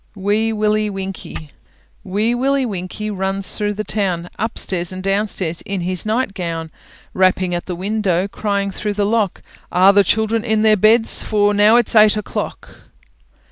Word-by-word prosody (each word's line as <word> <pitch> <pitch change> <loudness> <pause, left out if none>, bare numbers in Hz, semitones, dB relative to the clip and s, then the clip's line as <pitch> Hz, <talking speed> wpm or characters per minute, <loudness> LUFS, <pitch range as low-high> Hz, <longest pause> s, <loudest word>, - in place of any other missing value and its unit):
WEE 210 +3 0
WILLIE 215 0 0
WINKIE 190 -6 -7 0.5
Wee 210 +5 0
Willie 270 +2 +1
Winkie 205 0 -5
runs 195 0 -1
through 210 -1 -2
the 215 - -3
town, 180 -5 -2
Upstairs 190 -5 -1
and 185 0 -6
downstairs 195 -4 -1
in 195 -2 -4
his 185 +2 -3
nightgown, 180 -9 -2 0.4
Rapping 185 -1 +2
at 175 - -4
the 180 - -3
window, 195 -1 -1
crying 200 -1 -2
through 210 +2 -3
the 205 0 0
lock, 210 -3 0 0.3
"Are 190 +2 +5
the 200 0 +5
children 220 +3 +1
in 220 -2 +1
their 215 -1 +5
beds, 220 +3 +3
for 205 -1 +1
now 210 +2 +5
it's 240 -2 +3
eight 215 0 +6
o'clock?" 210 - -6
205 Hz, 155 wpm, -18 LUFS, 185-215 Hz, 0.5 s, eight